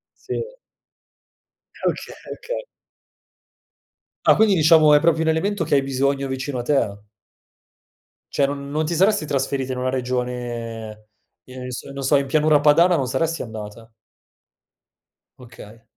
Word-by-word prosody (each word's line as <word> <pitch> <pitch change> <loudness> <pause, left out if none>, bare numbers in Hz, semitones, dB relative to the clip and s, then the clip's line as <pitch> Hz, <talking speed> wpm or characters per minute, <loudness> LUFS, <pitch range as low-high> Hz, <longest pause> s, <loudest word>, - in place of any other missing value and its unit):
Sì. - - -4 1.4
Oka - - -4
okay. - - -4 1.6
Ah - - +6
quindi 215 -3 +4
diciamo 155 -1 +6
è 150 - +6
proprio 165 -1 +2
un - - -2
elemento 180 +4 0
che - - +1
hai 140 - +4
bisogno 135 +1 -1
vicino 130 0 -4
a - - -1
te? 110 -7 -1 1.3
Cioè 140 - +3
non 140 0 -6
non 155 +2 0
ti 165 +2 -2
saresti 190 -3 +2
trasferita 135 -1 -1
in - - -6
una 130 0 -1
regione, 120 -4 -4 0.4
ehm, 130 +3 -9
n - - -6
s 125 - -6
non 140 - -6
so, 130 - +3
in 140 - 0
pianura 150 +1 +3
padana 170 +4 +5
non 135 -4 0
saresti 160 +6 -1
andata? 110 0 -9 1.5
Okay. 115 -2 -14
135 Hz, 140 wpm, -22 LUFS, 125-155 Hz, 1.6 s, Ah